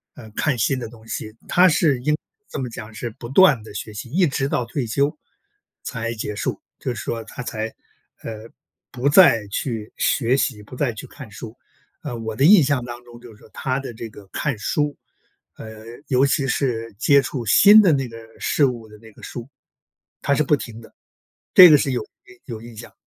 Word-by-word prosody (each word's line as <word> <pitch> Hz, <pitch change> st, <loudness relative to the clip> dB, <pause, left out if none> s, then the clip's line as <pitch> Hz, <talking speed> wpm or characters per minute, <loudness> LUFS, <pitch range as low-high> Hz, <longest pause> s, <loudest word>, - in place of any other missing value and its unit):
呃， 110 Hz, -, -12 dB
看 135 Hz, +5 st, -1 dB
新 130 Hz, +4 st, +1 dB
的 120 Hz, -, -5 dB
东 110 Hz, -1 st, -16 dB
西， 110 Hz, 0 st, -5 dB, 0.2 s
他 180 Hz, +1 st, +5 dB
是 150 Hz, -5 st, +2 dB
应 150 Hz, +4 st, +1 dB
该 -, -, -13 dB, 0.3 s
这 -, -, -6 dB
么 130 Hz, -, -3 dB
讲 115 Hz, -1 st, -9 dB
是 120 Hz, +2 st, -5 dB
不 120 Hz, -, -8 dB
断 140 Hz, -, +5 dB
地 110 Hz, -, -11 dB
学 105 Hz, +1 st, -6 dB
习， 105 Hz, +4 st, -7 dB
一 175 Hz, +7 st, +2 dB
直 135 Hz, -1 st, -1 dB
到 125 Hz, -, -1 dB
退 120 Hz, 0 st, -3 dB
休， 140 Hz, +7 st, 0 dB, 0.7 s
才 115 Hz, -2 st, -4 dB
结 105 Hz, -1 st, -4 dB
束， -, -, -3 dB, 0.2 s
就 125 Hz, -, -3 dB
是 -, -, -6 dB
说 115 Hz, -1 st, -4 dB
他 125 Hz, -, -8 dB
才， 110 Hz, -2 st, -3 dB, 0.6 s
呃， 110 Hz, 0 st, -8 dB, 0.4 s
不 125 Hz, +3 st, -2 dB
再 145 Hz, -, +6 dB
去 110 Hz, -2 st, -4 dB
学 125 Hz, -1 st, +2 dB
习， 110 Hz, -6 st, -1 dB
不 115 Hz, -, -12 dB
再 130 Hz, -1 st, 0 dB
去 110 Hz, -, -9 dB
看 140 Hz, -6 st, -12 dB
书。 110 Hz, +1 st, -9 dB, 0.5 s
呃， 120 Hz, -, -5 dB
我 110 Hz, -1 st, -5 dB
的 135 Hz, -, +2 dB
印 185 Hz, -1 st, +8 dB
象 135 Hz, -3 st, 0 dB
当 120 Hz, 0 st, -8 dB
中 120 Hz, -1 st, -14 dB
就 120 Hz, -, -13 dB
是 105 Hz, -, -19 dB
说 -, -, -18 dB
他 130 Hz, 0 st, -2 dB
的 135 Hz, -, -7 dB
这 115 Hz, +1 st, -7 dB
个 100 Hz, -1 st, -14 dB
看 140 Hz, -4 st, -2 dB
书， 145 Hz, +6 st, -1 dB, 0.6 s
呃， 110 Hz, -1 st, -10 dB, 0.2 s
尤 130 Hz, -3 st, +3 dB
其 140 Hz, 0 st, +1 dB
是 115 Hz, -4 st, -2 dB
接 140 Hz, +2 st, +5 dB
触 130 Hz, -2 st, -4 dB
新 205 Hz, -, +8 dB
的 190 Hz, -5 st, +4 dB
那 135 Hz, -2 st, 0 dB
个 115 Hz, -, -12 dB, 0.2 s
事 145 Hz, -, +2 dB
物 120 Hz, -4 st, -3 dB
的 105 Hz, -, -15 dB
那 110 Hz, -1 st, -15 dB
个 -, -, -19 dB
书， 120 Hz, +2 st, -8 dB, 0.7 s
他 140 Hz, -, +2 dB
是 140 Hz, -, +2 dB
不 150 Hz, 0 st, +2 dB
停 115 Hz, -4 st, -9 dB
的， 115 Hz, -, -17 dB, 0.6 s
这 185 Hz, -, +12 dB
个 150 Hz, -, +7 dB
是 140 Hz, -, -1 dB
有 125 Hz, -, -2 dB, 0.2 s
印 125 Hz, -1 st, -17 dB
有 115 Hz, -4 st, -7 dB
印 115 Hz, -1 st, -12 dB
象。 115 Hz, -, -10 dB
120 Hz, 230 characters per minute, -22 LUFS, 115-140 Hz, 0.7 s, 这